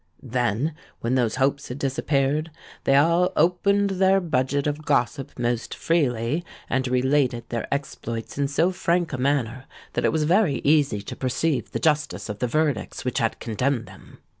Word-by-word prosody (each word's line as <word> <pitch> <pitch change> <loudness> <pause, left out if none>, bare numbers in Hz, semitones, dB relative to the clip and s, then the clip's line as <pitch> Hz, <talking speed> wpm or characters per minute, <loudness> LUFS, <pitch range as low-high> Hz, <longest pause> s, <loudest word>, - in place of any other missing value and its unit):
Then, 125 +3 0 0.3
when 115 +2 0
those 120 -4 +1
hopes 135 +1 0
had 125 - -6
disappeared, 140 +2 0 0.4
they 135 - +4
all 170 +5 +4
opened 200 +4 +3
their 190 +1 +4
budget 140 -5 0
of 150 +1 -2
gossip 140 -1 0
most 120 -1 -1
freely, 145 -2 0 0.2
and 130 0 0
related 125 -1 +1
their 115 -1 -4
exploits 115 -5 -4
in 140 0 0
so 160 +6 +2
frank 175 -2 0
a 130 - -3
manner, 130 -2 0 0.3
that - - -1
it - - +3
was 160 -1 +1
very 170 -2 +3
easy 140 -9 +3
to - - -7
perceive 135 +3 -1
the - - -3
justice 150 -9 0
of 105 0 -5
the 125 - 0
verdicts 145 -5 -1
which 125 +2 0
had 115 -2 0
condemned 120 +2 -1
them. - - -15
140 Hz, 165 wpm, -24 LUFS, 125-155 Hz, 0.4 s, they